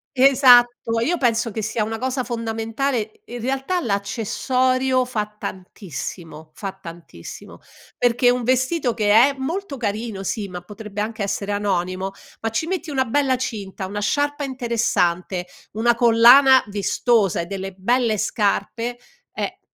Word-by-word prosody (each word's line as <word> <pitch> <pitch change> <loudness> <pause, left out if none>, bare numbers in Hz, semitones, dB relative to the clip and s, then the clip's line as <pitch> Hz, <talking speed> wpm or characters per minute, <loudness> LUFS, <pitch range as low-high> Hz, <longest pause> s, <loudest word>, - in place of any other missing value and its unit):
Esatto. 245 -3 +5
Io 350 +2 +1
penso 235 -3 +1
che 220 +1 -4
sia 220 +1 -1
una 225 +1 -4
cosa 260 0 -1
fondamentale 225 0 -3
in 240 +1 -7
realtà 270 +8 -1
l'accessorio 255 - 0
fa 220 -4 -2
tantissimo, 165 -4 -7
fa 195 -2 -5
tantissimo. 170 - -11 0.4
Perché 245 0 +3
un 250 0 -1
vestito 255 +2 +1
che 210 -2 +1
è 255 +6 +6
molto 320 +3 -4
carino, 215 -3 -3
sì, 205 0 -3
ma 180 -1 -7
potrebbe 210 +2 -7
anche 215 0 -4
essere 200 0 -2
anonimo 190 -2 -1 0.3
ma 225 - -1
ci 225 +8 -2
metti 350 -2 -3
una 265 -3 0
bella 265 +2 +1
cinta, 200 -6 -5
una 205 +2 -4
sciarpa 290 +6 0
interessante, 215 -9 -1 0.3
una 235 +2 +2
collana 240 +3 +7
vistosa 205 -1 +1
e - - -5
delle 195 +1 -6
belle 230 +3 +1
scarpe, 225 +3 -1 0.3
eh, - - -5
230 Hz, 135 wpm, -21 LUFS, 200-255 Hz, 0.4 s, collana